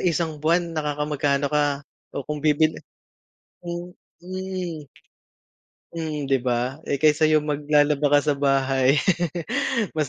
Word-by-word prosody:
isang 165 -3 -1
buwan 170 +2 +1
nakakamagkano 150 -2 -1
ka 145 -1 +1 0.3
o 140 - -3
kung 150 -1 -4
bibili 155 +1 +2 0.8
Hmm, 175 +1 -6 0.2
mm. 185 -3 -5 1.1
Mm 155 -4 -4
'di 135 - +4
ba, 125 +2 -1
eh, 140 - +1
kaysa 155 0 +5
'yung 155 -1 +3
maglalaba 145 0 +2
ka - - +5
sa - - -2
bahay, 135 -1 +3 1.0
mas 155 -1 +1
150 Hz, 120 wpm, -24 LUFS, 140-160 Hz, 1.1 s, kaysa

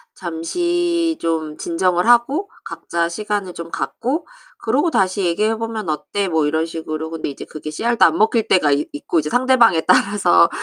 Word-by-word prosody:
잠시 340 - -1
좀 160 -2 -2
진정을 180 +1 0
하고 270 - +3 0.2
각자 170 0 -2
시간을 205 0 -3
좀 170 0 -8
갖고 300 +7 -3 0.3
그러고 285 +9 0
다시 190 +1 +1
얘기해 210 +6 +1
보면 225 -3 -5
어때?" 155 +6 -2
뭐 160 -4 +1
이런 160 +2 0
식으로. 160 -1 -5
근데 165 -2 -4
이제 140 - -8
그게 155 0 -8
씨알도 235 +9 +1
안 - - +3
먹힐 220 +1 +2
때가 155 -6 +3
있 145 +1 0
있고 150 +3 -1
이제 150 - -3
상대방에 245 -7 +4
따라서 185 -1 +4
185 Hz, 340 characters per minute, -19 LUFS, 160-235 Hz, 0.3 s, 상대방에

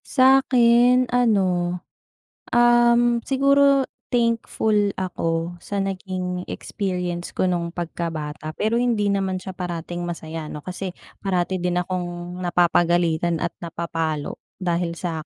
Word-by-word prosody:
Sa'kin 255 -2 +5
ano, 235 -5 +4 1.1
um, 240 0 +5
siguro 275 0 +4 0.2
thankful 225 -3 +1
ako 170 -2 -2
sa 200 +3 -3
naging 185 -2 -3
experience 180 -3 -4
ko 185 - +1
nung 170 -1 -2
pagkabata 155 -3 -4
pero 220 +2 0
hindi 230 -4 +1
naman 195 -1 0
siya 190 - -6
parating 175 -1 -4
masaya 165 -2 -5
‘no 150 - -7
kasi, 185 0 -5 0.3
parati 185 -1 0
din 180 0 0
akong 175 0 -5
napapagalitan 175 -2 +2
at 175 - -1
napapalo 165 -3 -3 0.2
dahil 175 -1 0
sa 165 -2 -4
180 Hz, 110 wpm, -23 LUFS, 170-230 Hz, 1.1 s, Sa'kin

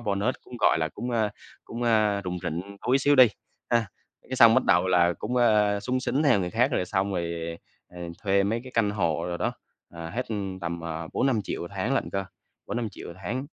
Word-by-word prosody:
bonus, 105 +2 0
cũng, 125 - -10
gọi - - +4
là, 80 -1 0
cũng, 120 +9 -6
à 110 -3 +1 0.3
cũng, 120 +1 -6
à, 110 -3 +3
rủng 90 0 -3
rỉnh 90 +4 -4
túi 130 +2 +4
xíu 145 +2 +3
đi, 130 -1 +9 0.4
ha. 115 -2 +3 0.4
Cái - - -3
xong - - +8
bắt - - +3
đầu - - +4
là 90 -1 +4
cũng, 125 +4 -3
à, 105 -4 +3
xúng 130 +4 -1
xính 130 +3 0
theo 135 -9 +4
người 90 -1 -2
khác, 125 +7 +2
rồi 90 - +1
xong 95 +1 -1
rồi, 85 -1 -3 0.3
ờ, 90 - -13 0.2
thuê 100 -1 +3
mấy 110 +4 0
cái 130 - -10
căn 110 -3 +2
hộ 85 -5 -1
đồ 85 - -2
đó, - - -1 0.4
ờ, 85 -1 -7
hết 125 +2 -3 0.3
tầm, 85 0 -4
ờ, 80 0 -5
4.000.000-5.000.000 120 -6 0
1 85 - -6
tháng 100 +8 0
lận - - -1
cơ, 95 0 -2 0.4
4.000.000-5.000.000 120 -3 -4
1 85 - -8
tháng. 125 +9 -3
100 Hz, 215 wpm, -26 LUFS, 90-120 Hz, 0.4 s, đi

